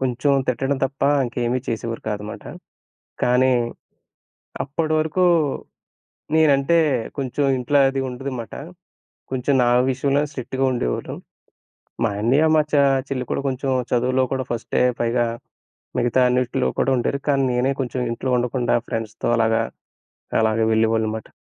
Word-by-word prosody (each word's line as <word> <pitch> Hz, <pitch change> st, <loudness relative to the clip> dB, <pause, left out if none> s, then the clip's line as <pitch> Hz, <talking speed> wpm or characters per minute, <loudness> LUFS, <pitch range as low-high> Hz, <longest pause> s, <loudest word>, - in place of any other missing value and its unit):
కొంచెం 130 Hz, +2 st, +1 dB, 0.2 s
తిట్టడం 135 Hz, +3 st, 0 dB
తప్ప 135 Hz, +1 st, -5 dB, 0.2 s
ఇంకేమి 120 Hz, +1 st, -1 dB
చేసేవారు 115 Hz, 0 st, -3 dB
కాదన్నమాట. 105 Hz, 0 st, -5 dB, 0.8 s
కానీ 125 Hz, +1 st, +3 dB, 1.1 s
అప్పటివరకు 155 Hz, +4 st, 0 dB, 1.1 s
నేనంటే 155 Hz, +1 st, +4 dB, 0.4 s
కొంచెం 140 Hz, +1 st, -1 dB
ఇంట్లో 135 Hz, +3 st, +2 dB
అది 135 Hz, 0 st, -2 dB
ఉండదు 130 Hz, +2 st, -5 dB
అన్నమాట. 120 Hz, -3 st, -6 dB, 0.8 s
కొంచెం 130 Hz, +2 st, 0 dB
నా 120 Hz, -, +3 dB, 0.2 s
విషయంలోనే 140 Hz, +3 st, +1 dB
స్ట్రిక్ట్‌గా 130 Hz, 0 st, -2 dB
ఉండేవాళ్లు. -, -, -2 dB, 0.9 s
మా 115 Hz, -, +3 dB
అన్నయ్య 135 Hz, +8 st, +3 dB
మా 155 Hz, -, +5 dB
చ -, -, +4 dB, 0.3 s
చెల్లి 130 Hz, -2 st, -3 dB
కూడా -, -, -1 dB
కొంచెం 135 Hz, +1 st, -2 dB, 0.2 s
చదువులో 125 Hz, +2 st, +2 dB
కూడా 130 Hz, -, -1 dB
ఫస్టే, 115 Hz, -1 st, -1 dB, 0.2 s
పైగా 120 Hz, +1 st, +1 dB, 0.7 s
మిగతా 120 Hz, +2 st, +2 dB
అన్నిటిలో 125 Hz, 0 st, 0 dB
కూడా 135 Hz, -, +2 dB
ఉండేరు 135 Hz, +3 st, -1 dB
కానీ 140 Hz, -1 st, +3 dB
నేనే 125 Hz, +2 st, +1 dB
కొంచెం 130 Hz, -1 st, -2 dB
ఇంట్లో 125 Hz, +3 st, -3 dB
ఉండకుండా 120 Hz, 0 st, 0 dB
ఫ్రెండ్స్‌‌‌‌‌‌‌తో 110 Hz, -1 st, -4 dB
అలాగా, 115 Hz, 0 st, +2 dB, 0.8 s
అలాగా 110 Hz, 0 st, +2 dB
వెళ్ళేవాళ్ళు 110 Hz, 0 st, +2 dB
మాట. 110 Hz, -, -7 dB
125 Hz, 125 wpm, -22 LUFS, 120-135 Hz, 1.1 s, మా